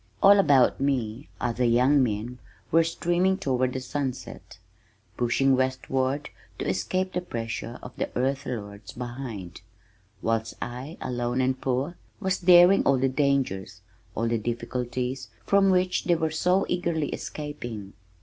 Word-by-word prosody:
All 200 +1 +8
about 135 -8 +4
me 130 -2 -1
other 120 +1 -1
young 125 +4 +4
men 120 +1 -2 0.3
were 165 +1 +5
streaming 175 +3 +1
toward 130 -7 0
the 130 - -2
sunset, 130 0 -5 0.6
pushing 130 +3 +2
westward 130 +1 -1 0.3
to - - -3
escape 110 - -1
the 180 - -1
pressure 115 -5 -5
of - - -9
the - - -2
earth 135 +2 0
lords 100 -4 -6
behind, 120 -8 -7 0.6
whilst 115 0 -1
I 125 +7 -6
alone 120 0 -2
and 130 0 0
poor, 135 +6 -1 0.2
was 190 -2 0
daring 180 +1 +7
all 140 - +3
the 135 +1 +2
dangers, 135 -8 0 0.3
all 115 +2 0
the 115 0 0
difficulties 125 +2 -3 0.2
from 200 -1 +4
which 185 -1 +2
they 175 - +3
were 160 -1 -1
so 180 +4 +2
eagerly 170 -4 -1
escaping. 120 -9 -6
130 Hz, 140 wpm, -26 LUFS, 120-160 Hz, 0.6 s, All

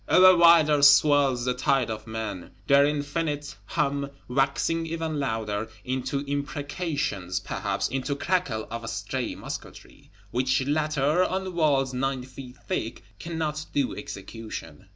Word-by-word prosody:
Ever 185 0 +7
wilder 165 -4 +6
swells 140 -3 +5
the 125 - +1
tide 130 -2 +1
of 110 0 -6
men; 110 -5 -5 0.2
their 140 +2 +5
infinite 145 0 -2
hum 140 +5 -1 0.2
waxing 140 +5 0
ever 165 -1 -2
louder, 110 -8 -2 0.2
into 130 +2 -2
imprecations, 145 - -2
perhaps 100 +1 -2
into 135 +1 -2
crackle 140 -9 -1
of 115 -1 -5
stray - - -3
musketry, - - -9 0.2
which 130 +2 +1
latter, 150 +2 +2
on 190 0 -2
walls 140 -6 +2
nine 130 0 -1
feet 130 0 -11
thick, 115 -3 -3 0.2
cannot 155 -2 -3
do 140 -3 0
execution. 100 -4 -8
140 Hz, 125 wpm, -26 LUFS, 120-150 Hz, 0.2 s, Ever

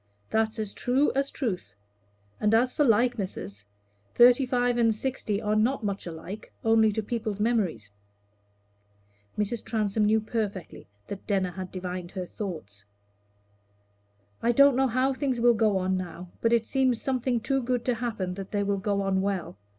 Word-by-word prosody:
That's 220 0 +1
as 215 -2 -3
true 260 +4 +1
as 275 +1 0
truth. 210 - -4 0.6
And 210 +1 +3
as 250 +2 +2
for 295 - +2
likenesses, 210 - 0 0.5
thirty 245 +2 +6
five 245 -1 +1
and 225 -2 +3
sixty 220 -4 -2
are 210 -1 0
not 230 +4 +1
much 200 -3 -3
alike, 170 +5 -8
only 225 -1 +5
to 220 +1 -2
people's 215 -2 -3
memories." 195 - 0 1.5
Mrs. 210 +2 -1
Transome 215 -1 0
knew 220 +1 +4
perfectly 210 -4 -4 0.2
that 200 - -8
Denner 190 -3 +1
had 185 +1 -7
divined 180 -1 -5
her 185 -2 -4
thoughts. 155 - -7 1.6
"I 235 - +3
don't 280 +2 +6
know 265 +1 +3
how 255 +3 +1
things 260 -2 -1
will 240 0 +5
go 215 -3 +2
on 185 0 0
now, 180 -1 -7
but 230 - +2
it 230 -1 +3
seems 260 -3 +1
something 255 -2 0
too 270 +4 0
good 245 -1 -1
to 250 - +2
happen 220 -6 -3
that 195 0 -7
they 205 -1 0
will 200 0 0
go 200 0 0
on 190 -1 +1
well. 195 -3 -2
220 Hz, 165 wpm, -27 LUFS, 195-245 Hz, 1.6 s, thirty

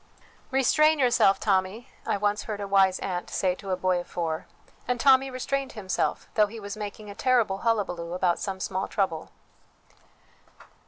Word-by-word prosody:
" - - -30
Restrain 305 +4 +4
yourself, 240 -7 +4
Tommy," 195 +4 0 0.2
I - - +1
once 205 +1 0
heard 210 -2 -4
a 200 - -4
wise 195 -1 +4
aunt 180 -2 -3
say 185 -2 0
to 195 +1 -10
a 185 - +1
boy 185 -1 +1
of 175 - -7
four, 165 -2 -3 0.4
and 250 -1 0
Tommy 270 +1 +5
restrained 270 +1 -3
himself, 195 -4 -2
though 210 -1 +4
he 225 +2 -9
was 200 -1 -6
making 210 0 -7
a - - -8
terrible 230 -5 +1
hullabaloo 185 -7 -1
about 180 -1 +1
some 195 -2 -4
small 190 0 -2
trouble. 180 -6 -2
200 Hz, 170 wpm, -26 LUFS, 185-235 Hz, 0.4 s, Tommy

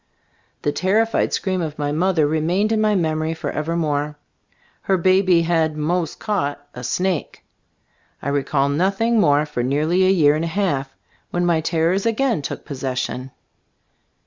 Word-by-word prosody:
The 145 - +1
terrified 220 +7 +1
scream 185 -2 -1
of 155 -2 -4
my 145 -1 -1
mother 165 0 +2
remained 165 +8 +1
in 220 -1 +2
my 215 -1 +2
memory 160 -2 0
forever 160 +1 -3
more. 150 -2 -1 0.6
Her 190 - +1
baby 185 -1 +3
had 160 -2 +1
"mos* 165 +2 -1
caught" 145 -9 -3
a 125 - -8
snake. 180 +4 -2 0.7
I 140 - -4
recall 140 0 +1
nothing 195 +10 +1
more 150 -5 +3
for 150 -5 -3
nearly 155 +8 +1
a - - +4
year 155 -6 +4
and 160 +2 -1
a - - -2
half, 160 -7 -1 0.3
when 175 0 -1
my 170 -2 +2
terrors 170 +5 +1
again 230 - +1
took - - -6
possession. 130 -1 -4
165 Hz, 150 wpm, -21 LUFS, 145-185 Hz, 0.7 s, a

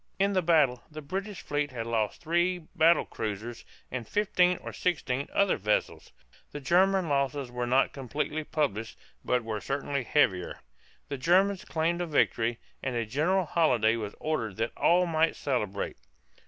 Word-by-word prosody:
In 200 +1 +2
the 185 - +2
battle 150 -8 +3
the 155 -1 -9
British 195 +6 -5
fleet 145 0 -1
had 115 -4 -5
lost 110 -3 -1
three 175 +2 +1
battle 170 0 +2
cruisers 110 +2 -5 0.3
and 120 -3 -4
fifteen 180 -3 +2
or - - -8
sixteen 140 -6 -1
other 200 -1 +2
vessels. 105 +1 -1 0.4
The 145 - -4
German 185 +5 +3
losses 140 -2 -1
were 125 0 -3
not 130 +2 +3
completely 145 +3 -3
published 115 -8 -2 0.3
but 125 -1 +1
were 110 -2 -4
certainly 140 0 -2
heavier. 95 -9 +1 0.5
The 140 -2 -4
Germans 185 +6 +3
claimed 170 +2 0
a 175 - -2
victory, 120 -6 +1 0.2
and 130 -2 -3
a 115 -1 0
general 165 - +1
holiday 120 -10 +3
was 105 -3 -5
ordered 120 -11 -2
that 115 +1 -2
all 180 +1 +4
might 165 -1 +1
celebrate. 105 -8 -2
145 Hz, 155 wpm, -28 LUFS, 120-170 Hz, 0.5 s, all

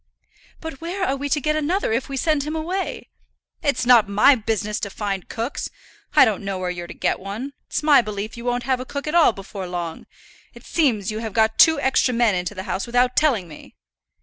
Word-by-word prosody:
"But 320 -3 -7
where 365 +3 -2
are 275 - 0
we 285 +1 -4
to 300 - +2
get 305 +2 0
another 310 - 0
if 235 +4 -1
we 275 - -4
send 305 +1 +1
him 300 +3 -4
away?" 355 +5 -3 0.5
"It's 280 -4 0
not 235 -4 +6
my 210 +8 +6
business 215 -3 -2
to 200 - -4
find 195 -2 -4
cooks. 230 +5 -4 0.5
I - - +8
don't 210 -4 -1
know 195 -1 -3
where 180 -1 -2
you're 175 -1 -6
to - - -8
get - - 0
one. 215 +9 -6
It's - - -3
my 295 -3 +6
belief 210 -1 -5
you 235 - -9
won't 245 0 -1
have 260 0 0
a - - -4
cook 280 +2 -6
at 305 - -3
all 340 -6 +6
before 195 -2 -8
long. 175 -2 -5 0.5
It - - -14
seems 230 - +1
you 215 - -4
have 220 -2 -5
got 220 0 +2
two 320 -2 +7
extra 265 -2 +2
men 235 -3 +3
into 180 +3 -3
the 190 - -5
house 195 +2 -3
without 245 +1 +2
telling 245 - +2
me." 150 - -13
240 Hz, 225 wpm, -22 LUFS, 205-285 Hz, 0.5 s, I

